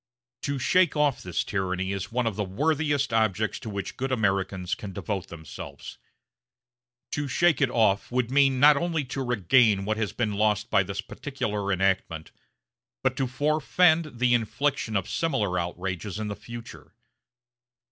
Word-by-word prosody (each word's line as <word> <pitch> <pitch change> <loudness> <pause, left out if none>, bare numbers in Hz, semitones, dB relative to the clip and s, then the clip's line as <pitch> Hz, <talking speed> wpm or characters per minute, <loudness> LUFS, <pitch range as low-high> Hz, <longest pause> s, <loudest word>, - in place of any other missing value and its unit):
To 140 -1 -2
shake 180 +5 +3
off 145 -3 +2
this 90 -2 -2
tyranny 95 -1 -2
is 100 +2 -4
one 125 +1 0
of 110 -3 -1
the 105 - -1
worthiest 145 +5 0
objects 110 -1 +1
to 110 - -7
which 100 -2 -5
good 135 +1 -2
Americans 95 -5 0
can 110 -5 -6
devote 100 0 -4
themselves. 80 -2 -9 1.1
To 145 0 -2
shake 165 +4 +2
it 140 - +3
off 110 -4 +2
would 125 -1 0
mean 135 -2 +4
not 150 +2 +8
only 165 -2 -1
to 130 +2 -4
regain 110 -3 +3
what 110 +1 -1
has 105 -4 -1
been 110 -4 -1
lost 105 +1 +1
by - - +5
this 100 0 -4
particular 105 -8 -4
enactment, 95 -4 0 0.7
but 130 -1 +1
to 135 -2 0
forefend 155 +2 +2
the 125 0 +3
infliction 120 +1 0
of 95 - -3
similar 110 - 0
outrages 90 +2 -4
in 110 -1 -3
the 100 - -4
future. 115 +3 -11
110 Hz, 155 wpm, -26 LUFS, 100-135 Hz, 1.1 s, not